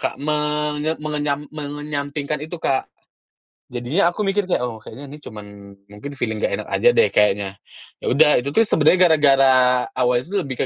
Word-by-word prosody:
Kak, -, -, -3 dB
menye 150 Hz, +1 st, -2 dB
mengenyam 150 Hz, -1 st, -3 dB
mengenyampingkan 145 Hz, -1 st, -4 dB
itu, 160 Hz, +3 st, -6 dB
Kak. 135 Hz, -5 st, -1 dB, 0.8 s
Jadinya 130 Hz, +10 st, 0 dB
aku -, -, -8 dB
mikir 200 Hz, +1 st, 0 dB
kayak, -, -, +1 dB
"Oh, 115 Hz, -2 st, -6 dB
kayanya 135 Hz, +7 st, -11 dB
ini 145 Hz, -, -10 dB
cuman 105 Hz, -5 st, -10 dB, 0.4 s
mungkin 105 Hz, +8 st, -9 dB
feeling 110 Hz, -3 st, -2 dB
nggak -, -, 0 dB
enak -, -, -8 dB
aja 485 Hz, -, +2 dB
deh 465 Hz, -, +3 dB
kayaknya." 100 Hz, -1 st, +1 dB, 0.5 s
Ya -, -, -6 dB
udah, 150 Hz, +2 st, +5 dB
itu 140 Hz, -, -4 dB
tuh 225 Hz, -, +3 dB
sebenernya 160 Hz, 0 st, +3 dB
gara-gara 135 Hz, -4 st, +4 dB
awalnya 125 Hz, -1 st, +1 dB
tuh 200 Hz, -, -1 dB
lebih 135 Hz, -5 st, -6 dB
145 Hz, 170 wpm, -20 LUFS, 125-150 Hz, 0.8 s, udah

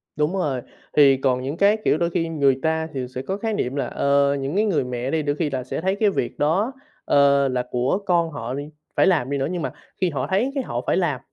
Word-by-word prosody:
Đúng 150 Hz, +4 st, 0 dB
rồi, 135 Hz, -8 st, -1 dB, 0.4 s
thì 140 Hz, -2 st, +7 dB
còn 130 Hz, -1 st, +1 dB
những 140 Hz, +5 st, -4 dB
cái, 200 Hz, +3 st, +4 dB
kiểu, -, -, +3 dB
đôi 170 Hz, +1 st, 0 dB
khi 165 Hz, -1 st, -1 dB
người 140 Hz, -4 st, +2 dB
ta 160 Hz, 0 st, 0 dB
thì 130 Hz, -2 st, -3 dB
sẽ 130 Hz, -, -2 dB
có 190 Hz, +9 st, -3 dB
khái 225 Hz, 0 st, -2 dB
niệm 130 Hz, -9 st, -2 dB
là, 140 Hz, -, -1 dB
ờ, 140 Hz, 0 st, +2 dB
những 135 Hz, +5 st, -3 dB
cái 215 Hz, -, +3 dB
người 190 Hz, -10 st, +1 dB
mẹ 125 Hz, +1 st, -3 dB
đi 160 Hz, -, +1 dB
đôi 145 Hz, 0 st, 0 dB
khi 150 Hz, -1 st, -1 dB
là 130 Hz, -2 st, -3 dB
sẽ 145 Hz, -, -4 dB
thấy 190 Hz, +2 st, +1 dB
cái 210 Hz, 0 st, +2 dB
việc 155 Hz, -10 st, -3 dB
đó, 180 Hz, -, +2 dB, 0.3 s
ờ, 140 Hz, -1 st, +4 dB
là 125 Hz, -1 st, -1 dB
của 125 Hz, +7 st, +1 dB
con 170 Hz, -2 st, +2 dB
họ 125 Hz, -3 st, -5 dB
đì 145 Hz, +2 st, -5 dB, 0.3 s
phải -, -, +4 dB
làm 155 Hz, -9 st, +2 dB
đi 140 Hz, -, -1 dB
nữa, 135 Hz, -, -1 dB
nhưng 180 Hz, -2 st, -3 dB
mà -, -, -2 dB, 0.3 s
khi 185 Hz, -, +3 dB
họ 145 Hz, -, -3 dB
thấy 205 Hz, +8 st, +1 dB
cái 270 Hz, -, 0 dB
họ 120 Hz, -, -3 dB
phải -, -, +2 dB
làm, 155 Hz, -8 st, 0 dB
145 Hz, 265 wpm, -23 LUFS, 135-175 Hz, 0.4 s, thì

